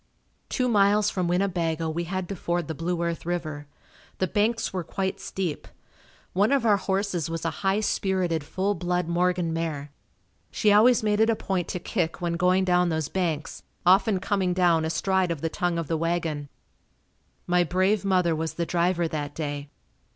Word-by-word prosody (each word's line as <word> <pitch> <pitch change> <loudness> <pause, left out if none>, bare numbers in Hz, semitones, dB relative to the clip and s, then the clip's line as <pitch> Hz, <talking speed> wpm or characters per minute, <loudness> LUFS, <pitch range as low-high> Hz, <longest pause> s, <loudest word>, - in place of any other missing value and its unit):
Two 255 - 0
miles 210 -1 +3
from 180 -2 -1
Winnebago 170 -3 0
we 165 +2 -2
had 185 +1 -3
to 195 - -4
ford 170 -2 -2
the 160 - -3
Blue 170 +2 -2
Earth 170 -1 -2
River. 155 -4 -4 0.5
The 185 - +1
banks 220 +4 0
were 185 -2 -2
quite 190 +2 -3
steep. 180 -6 -4 0.7
One 200 +6 +3
of 275 -4 +2
our 210 -2 +5
horses 190 -4 -1
was 165 0 -4
a 165 - +1
high 195 +1 +2
spirited 185 -6 0
full 190 +7 -1
blood 180 -2 -1
Morgan 175 -1 +1
mare. 155 -3 -3 0.6
She 210 - +2
always 225 +3 +5
made 210 -1 +1
it 220 +1 +4
a 230 - +3
point 185 -5 -2
to 180 - -3
kick 175 -2 -2
when 175 -1 -1
going 180 +2 +2
down 180 -1 +3
those 160 -3 -1
banks, 165 -4 -2 0.2
often 195 +2 +4
coming 190 -1 0
down 170 -3 +3
astride 190 +3 +1
of 165 -4 -3
the 165 - -1
tongue 175 0 -1
of 165 -3 -3
the 165 - 0
wagon. 165 -3 -2 1.0
My 180 0 +3
brave 185 +4 +1
mother 180 -4 +2
was 160 +1 -3
the 170 - -1
driver 175 0 +1
that 145 -2 -4
day. 145 -2 -4
180 Hz, 180 wpm, -26 LUFS, 165-190 Hz, 1.0 s, our